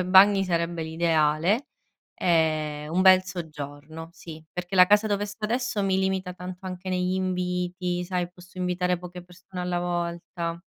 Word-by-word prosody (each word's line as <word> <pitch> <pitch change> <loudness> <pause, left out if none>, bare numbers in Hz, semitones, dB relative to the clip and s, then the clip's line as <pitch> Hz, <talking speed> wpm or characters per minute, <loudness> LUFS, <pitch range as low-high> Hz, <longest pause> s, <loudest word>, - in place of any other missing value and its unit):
2 - - 0
bagni 195 +2 +6
sarebbe 170 -2 -1
l'ideale, 160 - +2 0.5
ehm, 155 -3 +1
un 185 +2 +3
bel 185 -1 +7
soggiorno 160 -3 -7
sì, 160 -3 -10
perché 180 +1 -5
la 180 - +9
casa 210 +3 +4
dove 205 -1 0
sto 210 +1 -7
adesso 235 -2 0
mi 190 -1 +2
limita 190 -1 -1
tanto 180 +1 -8
anche 185 0 -6
negli 180 0 0
inviti, 180 -1 -1
sai, 180 -1 -2
posso 180 +1 -14
invitare 180 0 0
poche 180 0 -9
persone 180 +1 -10
alla 180 0 -1
volta. 170 -1 -3
180 Hz, 155 wpm, -26 LUFS, 170-185 Hz, 0.5 s, la